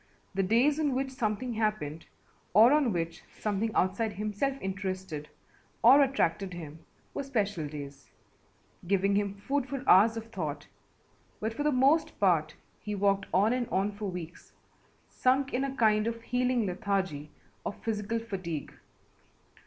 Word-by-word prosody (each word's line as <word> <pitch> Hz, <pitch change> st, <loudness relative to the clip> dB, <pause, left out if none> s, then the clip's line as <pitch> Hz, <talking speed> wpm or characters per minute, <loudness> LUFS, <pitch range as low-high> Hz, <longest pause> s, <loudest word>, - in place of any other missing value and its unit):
The 195 Hz, -, +1 dB
days 240 Hz, +10 st, +3 dB
on 290 Hz, -4 st, +1 dB
which 265 Hz, 0 st, -1 dB
something 240 Hz, -1 st, -2 dB
happened 210 Hz, -9 st, -2 dB, 0.5 s
or 230 Hz, +6 st, +8 dB
on 290 Hz, -6 st, +3 dB
which 165 Hz, -2 st, -3 dB, 0.2 s
something 210 Hz, +1 st, 0 dB
outside 200 Hz, +4 st, +1 dB
himself 215 Hz, +7 st, -2 dB
interested 185 Hz, -5 st, -4 dB, 0.5 s
or 265 Hz, +5 st, +8 dB
attracted 195 Hz, -9 st, +1 dB
him 160 Hz, -2 st, -8 dB, 0.3 s
were -, -, -2 dB
special 205 Hz, -, -1 dB
days, 145 Hz, -2 st, -9 dB, 0.8 s
giving 195 Hz, +1 st, +2 dB
him 200 Hz, -1 st, 0 dB
food 270 Hz, +6 st, -2 dB
for 275 Hz, -1 st, -5 dB
hours 220 Hz, +5 st, +6 dB
of 225 Hz, 0 st, -7 dB
thought, 155 Hz, -8 st, -4 dB, 0.7 s
but 220 Hz, +1 st, -2 dB
for 260 Hz, -, -4 dB
the 300 Hz, +1 st, +2 dB
most 275 Hz, +5 st, +3 dB
part 170 Hz, -6 st, +2 dB, 0.2 s
he 210 Hz, +1 st, -4 dB
walked 195 Hz, 0 st, +1 dB
on 205 Hz, +5 st, +3 dB
and 250 Hz, -2 st, -1 dB
on 195 Hz, +2 st, +1 dB
for 205 Hz, +1 st, -6 dB
weeks, 175 Hz, -2 st, -8 dB, 0.5 s
sunk 265 Hz, +2 st, +1 dB
in 255 Hz, -, +1 dB
a 270 Hz, -1 st, -3 dB
kind 215 Hz, -3 st, +3 dB
of 230 Hz, 0 st, -4 dB
healing 245 Hz, -1 st, +1 dB
lethargy 190 Hz, -6 st, -2 dB, 0.3 s
of -, -, -4 dB
physical 220 Hz, 0 st, -1 dB
fatigue. 185 Hz, -9 st, -5 dB
210 Hz, 145 wpm, -29 LUFS, 185-245 Hz, 0.8 s, or